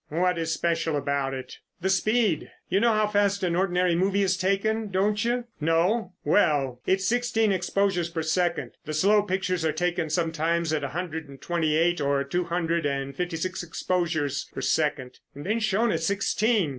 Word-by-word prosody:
"What 180 +2 +1
is 165 0 -1
special 165 -1 0
about 140 -1 -1
it?" 130 -1 -8 0.2
"The 190 +2 -1
speed. 215 -3 +1 0.2
You 190 - +2
know 230 +1 +3
how 215 0 +3
fast 205 -1 +1
an 175 -2 +1
ordinary 180 -1 +2
movie 195 +3 +2
is 190 -1 +2
taken, 200 +4 0
don't 205 +3 +1
you? 240 +1 0
No? 180 +6 +1
Well, 135 -10 +2
it's 190 0 +2
sixteen 235 -3 +1
exposures 190 -2 0
per 165 -1 -3
second. 170 +2 0
The 155 0 -4
slow 205 +6 +4
pictures 185 -3 -1
are 160 - +2
taken 175 +1 -1
sometimes 165 0 0
at 150 -2 -1
a - - -1
hundred 160 -4 -4
and 135 -1 -12
twenty 160 -1 0
eight 175 0 +2
or 140 -1 +1
two 175 +6 -2
hundred 170 -1 -1
and 140 -1 -3
fifty 175 +1 -2
six 185 +3 -3
exposures 165 -5 -2
per - - -6
second, 140 -5 -1 0.2
and 145 - -8
then 215 +4 0
shown 215 +1 +1
at - - -1
sixteen. 200 -1 +1
175 Hz, 180 wpm, -26 LUFS, 160-200 Hz, 0.2 s, slow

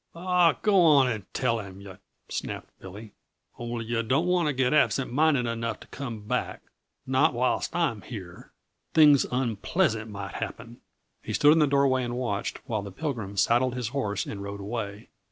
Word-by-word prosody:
"Aw, 175 -1 +3
go 200 -3 +5
on 145 -6 +6
and 110 -5 -4
tell 115 0 0
him, 95 -2 -9
yuh 100 -2 -11 0.2
!" - - -50
snapped - - -5
Billy. 105 +3 -10 0.5
"Only 120 -1 -4
yuh 115 0 -1
don't 130 +9 +1
want 180 -2 +2
to 150 - +1
get 130 +1 +1
absent 135 -4 +2
minded 145 -3 +3
enough 115 0 -3
to - - -13
come 120 -6 -6
back - - -2 0.4
not 130 +2 +2
whilst 125 +2 0
I'm 165 -12 0
here; 95 -7 -10 0.4
things 150 -3 +6
unpleasant 120 - 0
might 100 -2 -7
happen." 120 +1 -7 0.4
He - - -5
stood 145 +1 +6
in 165 - +3
the 150 - +4
doorway 140 -2 +2
and 120 0 -3
watched 115 -6 -3
while 110 -5 -1
the 100 -1 -8
Pilgrim 105 - -4
saddled 120 +4 +2
his 125 -3 -3
horse 105 -6 -2
and 100 - -6
rode 100 0 -6
away. 105 +1 -5
120 Hz, 180 wpm, -27 LUFS, 105-140 Hz, 0.5 s, on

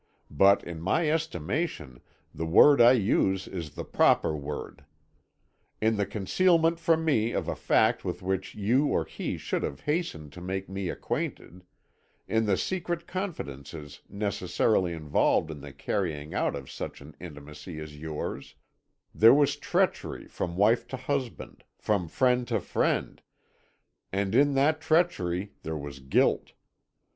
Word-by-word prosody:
But 95 +7 +5
in 85 -2 -7
my 150 - +1
estimation 135 - -3 0.3
the 80 +1 -4
word 140 - +7
I 120 +2 +8
use 95 -4 +1
is 85 -5 -6
the - - -5
proper 80 - +3
word. 75 -1 -6 1.0
In 110 +1 +2
the 100 -2 0
concealment 165 - +2
from 160 -1 +2
me 115 -7 +2
of - - -2
a - - -2
fact - - +2
with - - -4
which 95 0 -2
you 120 +8 +2
or - - 0
he - - -4
should - - -2
have 70 - -4
hastened 145 - -3
to 90 - -10
make 95 +2 -4
me 95 -1 -4
acquainted; 90 +1 -4 0.6
in 110 0 +1
the 95 -2 +2
secret 175 -2 -2
confidences 75 - -6
necessarily 100 -2 0
involved 80 0 +1
in 75 -2 -8
the 70 0 -9
carrying 75 0 -3
out - - 0
of 70 -2 -8
such - - -6
an 70 +1 -13
intimacy 75 0 -9
as 75 -1 -8
yours; 75 -3 -5 0.6
there 115 +4 +7
was 145 -1 +3
treachery - - -1
from 85 -1 -4
wife 110 +4 +3
to 130 - -5
husband, 130 -1 -4
from 100 -5 0
friend 125 +5 +1
to - - 0
friend, - - -1 0.9
and 100 0 -1
in 140 +3 +4
that 150 +3 +2
treachery 130 - +1
there 80 0 -4
was 70 -2 -7
guilt. 65 0 +1
95 Hz, 145 wpm, -28 LUFS, -, 1.0 s, I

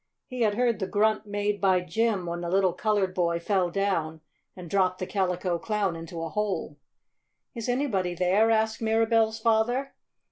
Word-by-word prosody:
He 255 -2 -6
had 210 -2 +2
heard 240 -1 +1
the 190 - -2
grunt 215 +2 +1
made 205 0 -2
by 190 -2 +3
Jim 215 0 0
when 170 0 -4
the 170 - -3
little 190 -1 +2
colored 200 -1 0
boy 170 -2 0
fell 185 0 0
down 170 -5 -1 0.3
and 180 -2 -9
dropped 185 0 +1
the 185 - -4
Calico 180 -2 -1
Clown 205 -2 -1
into 165 0 -7
a 165 - -4
hole. 185 -7 -3 0.7
"Is 230 -1 -5
anybody 210 -9 0
there?" 190 +6 +3
asked 220 0 +1
Mirabell's 225 0 +2
father. 230 +4 +1
200 Hz, 170 wpm, -27 LUFS, 180-220 Hz, 0.7 s, by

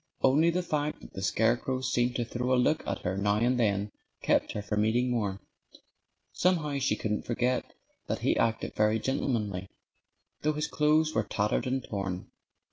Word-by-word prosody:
Only 150 +6 +5
the 180 +2 0
fact 150 -2 -2
that - - -13
the 95 - -6
scarecrow 120 +6 +1
seemed 125 -1 +1
to 120 - 0
throw 125 +2 0
a - - +2
look 155 +5 +2
at 100 - -2
her 90 +2 -1
now 100 +1 +1
and 120 +3 +2
then 100 -2 +1 0.3
kept - - +2
her 105 - -4
from 105 +1 0
eating 120 +3 +2
more. 100 -5 -1 0.9
Somehow 155 -6 +1
she 135 - +1
couldn't 105 -1 -2
forget 125 +1 0 0.4
that - - -2
he - - +3
acted 115 0 0
very 105 +1 +2
gentlemanly, 105 -7 -2 0.7
though 155 +1 +1
his 150 0 -1
clothes 155 +1 +2
were 110 - +2
tattered 105 +3 0
and 130 0 -1
torn. 95 -3 -4
120 Hz, 175 wpm, -29 LUFS, 105-135 Hz, 0.9 s, Only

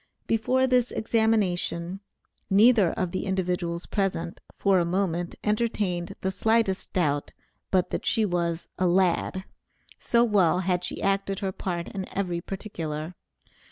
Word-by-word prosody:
Before 250 +4 +2
this 250 -2 +2
examination, 195 -5 0 0.5
neither 210 -2 +5
of 185 -2 -2
the 185 - -3
individuals 180 -2 -1
present 190 -4 -2 0.2
for 195 -2 +3
a - - +2
moment 175 -1 -1
entertained 210 -5 -1
the 190 - 0
slightest 220 0 +1
doubt 145 -5 0 0.4
but 185 -2 +1
that - - -3
she 220 - +3
was 170 -3 -1
a 185 - +3
"lad," 185 +1 +1 0.6
so 235 0 +3
well 190 -6 +3
had 180 -1 0
she - - -4
acted 195 0 0
her 195 -1 -1
part 175 -2 -4
in 190 -2 -5
every 175 -3 -1
particular. 165 -5 -5
190 Hz, 135 wpm, -26 LUFS, 175-210 Hz, 0.6 s, neither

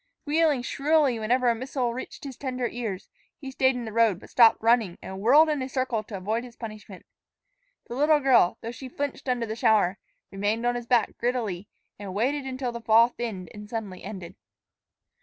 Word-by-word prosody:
Squealing 300 -3 +2
shrilly 280 -2 +2
whenever 245 +3 +1
a 235 - +5
missile 250 0 -2
reached 255 - -8
his 275 -3 -7
tender 255 -2 -3
ears, 225 -7 -5 0.3
he 270 -2 -8
stayed 260 0 +2
in 245 -1 -4
the 220 - -7
road, 225 -5 +3
but - - -15
stopped 230 -2 +6
running, 225 -5 +2
and 190 0 -8
whirled 280 +10 +6
in 300 -3 -1
a 260 - -4
circle 255 -4 -1
to 210 -2 -8
avoid 215 +5 -2
his 245 -2 -12
punishment. 215 -4 -10 0.8
The - - -7
little 300 +4 +3
girl, 255 -10 +4
though 230 - -5
she 255 +2 -9
flinched 280 0 -4
under 245 -2 0
the 220 0 -5
shower, 210 -4 +2 0.3
remained 205 +4 -1
on 245 - +2
his 240 -1 -5
back 235 -4 +2
grittily 220 -7 -2 0.3
and 195 -2 -7
waited 270 +6 0
until 255 -1 -3
the 235 0 -7
fall 230 +1 +5
thinned 215 -8 -6
and 210 0 -10
suddenly 210 -5 -6
ended. 185 -3 -8
235 Hz, 195 wpm, -26 LUFS, 215-260 Hz, 0.8 s, stopped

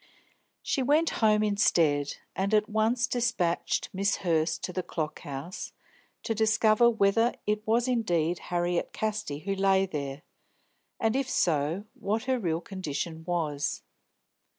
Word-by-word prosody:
She 270 - 0
went 300 +5 +3
home 215 -1 +4
instead, 165 -8 +2 0.2
and 200 +3 +1
at 210 0 +3
once 220 +3 +1
despatched 230 -10 0
Miss 195 +2 +1
Hurst 160 -1 +1
to 180 - -3
the 185 - -1
Clock 155 -3 -4
House 145 +4 -7 0.5
to 225 - -1
discover 220 +1 +4
whether 225 +2 +2
it 210 0 0
was 235 +3 +2
indeed 175 -9 +1
Harriet 175 0 -1
Casti 215 -9 -2
who 195 +3 -2
lay 195 0 +3
there, 145 -5 -5 0.8
and, 225 +1 +1
if 270 -1 0
so, 165 - +1
what 215 +3 -2
her 260 0 0
real 170 -5 -1
condition 160 -3 -5
was. 155 -5 -2
195 Hz, 135 wpm, -28 LUFS, 165-220 Hz, 0.8 s, home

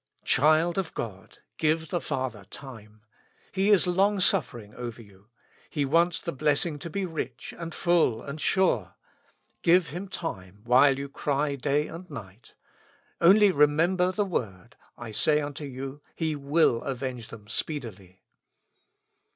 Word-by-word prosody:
Child 155 +6 +3
of 185 -4 -4
God! 100 -5 -7
give 160 0 0
the 175 - -1
Father 130 -8 -3
time. 110 -4 -12 0.5
He 195 +1 +1
is 205 -3 +5
long 195 +3 +2
suffering 115 - +1
over 120 -1 -7
you. 100 -2 -17 0.4
He 145 -3 -1
wants 165 +4 +2
the 170 - -4
blessing 150 +2 0
to 170 - -6
be 195 +3 -2
rich, 130 -8 -5
and 165 -1 -6
full, 170 -12 +2
and 145 +2 -7
sure; 190 -1 +1 0.7
give 175 0 +4
Him 180 +6 -6
time, 100 - -6
while 130 +3 +5
you 140 0 -4
cry 145 +1 -1
day 140 +2 0
and 175 +3 -9
night. 100 0 -11 0.7
Only 200 +4 +7
remember 170 +5 +3
the 205 +2 0
word: 105 - -4 0.2
"I 120 -2 -8
say 150 +8 +3
unto 145 0 -5
you, 135 +1 -7
He 160 -2 -1
will 140 -4 +2
avenge 130 -3 -4
them 105 -2 -12
speedily." 105 - -5
145 Hz, 145 wpm, -27 LUFS, 120-170 Hz, 0.7 s, Only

